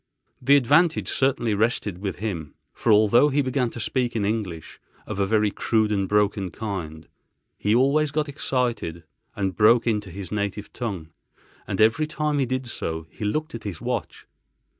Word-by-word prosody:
The 135 +3 +5
advantage 155 +6 +3
certainly 130 -4 +1
rested 105 -3 0
with 100 -1 -3
him, 90 -9 -5 0.2
for 115 - 0
although 110 +7 +5
he 145 +1 +1
began 130 -1 0
to 120 - -9
speak 120 +2 -1
in 105 -3 0
English, 100 -7 -4 0.3
of 105 -2 -5
a 100 - +2
very 105 0 +2
crude 110 0 +1
and 100 -2 0
broken 105 -2 +1
kind, 85 -5 -6 0.5
he 105 +2 +1
always 140 +4 +3
got 150 +1 -1
excited 125 - -2 0.3
and 95 -2 -2
broke 115 +3 +5
into 105 -4 0
his 95 0 -8
native 105 0 -3
tongue—and 95 -3 -7
every 115 +8 +4
time 150 -1 -1
he 135 - +1
did 130 +1 -2
so, 80 -8 -4
he - - -8
looked 155 +10 -1
at 115 - -7
his 95 -6 -5
watch. - - -4
110 Hz, 165 wpm, -24 LUFS, 100-130 Hz, 0.5 s, The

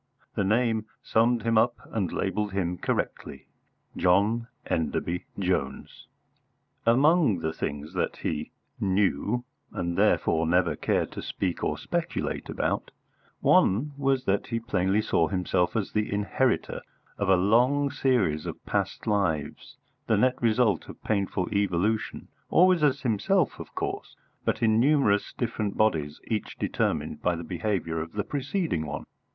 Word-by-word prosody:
The - - 0
name 110 +1 +1 0.2
summed 115 +1 +2
him 115 -1 +3
up 120 +1 +2 0.2
and 100 -6 -1
labelled 105 +1 -1
him 90 -2 -1
correctly - - -3 0.5
John 105 +6 +2 0.2
Enderby 85 +2 -1
Jones. 90 -8 -2 0.8
Among 140 - +4
the 80 -1 -2
things 75 +4 -5
that 90 - -1
he 75 -1 -3 0.3
knew, 100 - +1 0.3
and 85 0 -3
therefore 80 -1 +2
never 90 0 +2
cared - - 0
to - - -6
speak 90 -3 -3
or - - 0
speculate - - -3
about, - - -1 0.5
one 120 +11 +4
was 135 -2 0
that 95 +1 +1
he 115 0 -1
plainly 105 -3 +1
saw 80 - +2
himself 90 -2 0
as 105 -4 -1
the 105 0 -1
inheritor 100 -2 0 0.4
of 100 -2 0
a 95 - +7
long 125 +9 +3
series 100 - +1
of - - -7
past - - -2
lives, 85 -8 -1 0.3
the - - +3
net 130 0 +4
result 115 -5 +2
of - - -11
painful 100 -3 0
evolution, 100 +2 0 0.2
always 180 -1 +5
as 140 -2 +2
himself, 125 - +1
of - - -10
course, - - -4 0.3
but - - 0
in 110 0 +4
numerous 135 -6 +3
different 110 -4 -3
bodies 80 -9 +1
each 110 -2 -3
determined 75 - -1
by 90 - +1
the 85 - -6
behaviour 85 -2 -2
of 80 0 -7
the 105 - -1
preceding 145 - -2
one. 75 - -5
105 Hz, 140 wpm, -27 LUFS, 90-120 Hz, 0.8 s, a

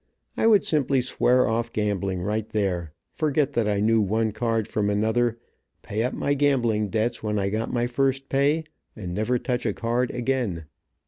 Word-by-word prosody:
I - - +2
would 210 -4 +5
simply 140 -3 +2
swear 125 0 +2
off 115 +1 -1
gambling 100 -3 -1
right 105 +2 -2
there, 90 -6 -1 0.2
forget 145 -2 0
that 115 -4 +1
I 100 -1 +1
knew 110 +1 +3
one 110 +2 0
card 115 -1 -1
from 105 -1 -1
another, 110 +3 +1 0.5
pay 105 +2 -3
up 125 - -1
my 145 - 0
gambling 120 -7 +1
debts 115 +4 -1
when 105 -1 -1
I 100 -1 0
got 110 +3 -2
my 120 -1 0
first 135 +2 0
pay, 145 +4 +2 0.3
and 90 -5 -6
never 110 +6 0
touch 125 0 -2
a 110 - 0
card 120 +3 -1
again. 120 -9 -2
115 Hz, 180 wpm, -25 LUFS, 105-125 Hz, 0.5 s, would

